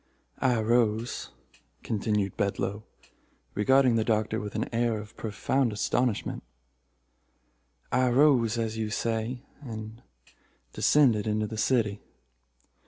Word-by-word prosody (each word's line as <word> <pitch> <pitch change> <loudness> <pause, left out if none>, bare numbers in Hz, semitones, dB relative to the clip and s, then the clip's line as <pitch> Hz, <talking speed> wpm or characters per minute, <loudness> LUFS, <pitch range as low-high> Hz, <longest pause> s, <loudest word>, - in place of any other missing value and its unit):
"I 130 -2 +2
arose," 115 0 +1 0.5
continued 105 -2 -1
Bedloe, 100 +1 -1 0.7
regarding 130 +3 +4
the 110 - +2
Doctor 110 0 0
with 105 -1 -6
an - - -1
air 115 -1 +1
of 105 +1 -11
profound 115 +4 0
astonishment 115 +2 -1 1.5
"I 130 0 +3
arose, 125 -3 +4
as 110 -1 -2
you 110 -1 -1
say, 115 +3 -2 0.2
and 110 -3 -8 0.7
descended 120 -8 +3
into 105 0 0
the 110 - -6
city. 110 -5 +1
110 Hz, 105 wpm, -28 LUFS, 105-120 Hz, 1.5 s, regarding